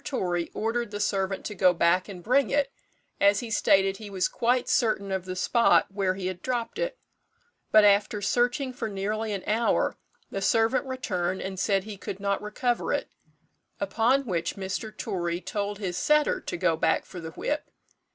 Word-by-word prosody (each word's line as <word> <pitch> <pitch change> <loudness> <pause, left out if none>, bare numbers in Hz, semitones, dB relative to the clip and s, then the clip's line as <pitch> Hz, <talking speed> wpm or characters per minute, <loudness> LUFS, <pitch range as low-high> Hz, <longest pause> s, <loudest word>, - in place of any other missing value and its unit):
Torry 175 -10 -1
ordered 230 +1 -1
the 205 0 -5
servant 195 -2 -1
to 210 - -4
go 185 -2 +4
back 175 +3 +2
and 180 -3 -9
bring 255 +4 +3
it, 280 -1 +1 0.5
as 200 0 +4
he 235 -2 -6
stated 195 -2 +3
he 215 -2 -9
was 190 -2 0
quite 245 +1 +1
certain 215 -5 +1
of 190 -1 -2
the 185 0 -5
spot 230 +3 +3
where 195 -2 0
he 190 -1 -5
had 185 -1 -3
dropped 245 - -3
it; - - -2 0.7
but 215 - +7
after 205 +1 +4
searching 245 +6 +1
for 230 -3 -4
nearly 210 +2 -2
an 195 -2 -3
hour, 225 +2 +1 0.4
the 195 - -3
servant 225 +6 +2
returned 190 -8 -2
and 190 -1 -5
said 195 -1 +1
he 210 -1 -8
could 190 0 -6
not 200 0 -1
recover 240 +3 -1
it, - - -2 0.7
upon 255 +5 +2
which 170 -6 -2
Mr. 195 +3 -4
Torry 175 -5 -2
told 205 +2 -3
his 185 -4 -3
setter 300 0 +3
to - - -4
go - - +2
back - - +1
for 180 - -9
the 165 -1 -6
whip. - - -3
205 Hz, 180 wpm, -27 LUFS, 190-235 Hz, 0.7 s, but